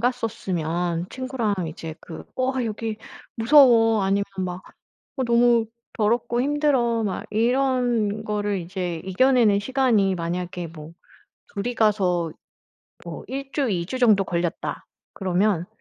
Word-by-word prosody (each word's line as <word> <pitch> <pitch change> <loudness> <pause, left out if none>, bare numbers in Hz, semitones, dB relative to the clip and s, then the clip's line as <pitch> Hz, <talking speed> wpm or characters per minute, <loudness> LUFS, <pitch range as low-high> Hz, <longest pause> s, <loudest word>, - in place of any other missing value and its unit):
갔었으면 180 -8 -1
친구랑 255 -5 -2
이제 160 0 -7
그 165 - -9
"어 255 +1 +1
여기 220 0 -3 0.4
무서워." 230 -4 +6
아니면 200 +1 +1
막 185 0 -3 0.5
"어 260 - 0
너무 235 -1 +3 0.3
더럽고 235 +2 0
힘들어." 265 -5 +1
막 195 -3 -3
이런 235 -2 +1
거를 205 -1 -1
이제 175 -1 -4
이겨내는 220 +1 +3
시간이 220 -4 +2
만약에 175 0 -4
뭐 155 0 -11 0.6
둘이 235 +5 -2
가서 185 -7 +1 0.7
뭐 - - -7
1 270 +1 -6
주, 280 -4 0
2 175 -3 -1
주 260 +7 -4
정도 215 -6 +4
걸렸다 170 -1 -3 0.3
그러면 185 -1 0
215 Hz, 235 characters per minute, -23 LUFS, 180-245 Hz, 0.7 s, 무서워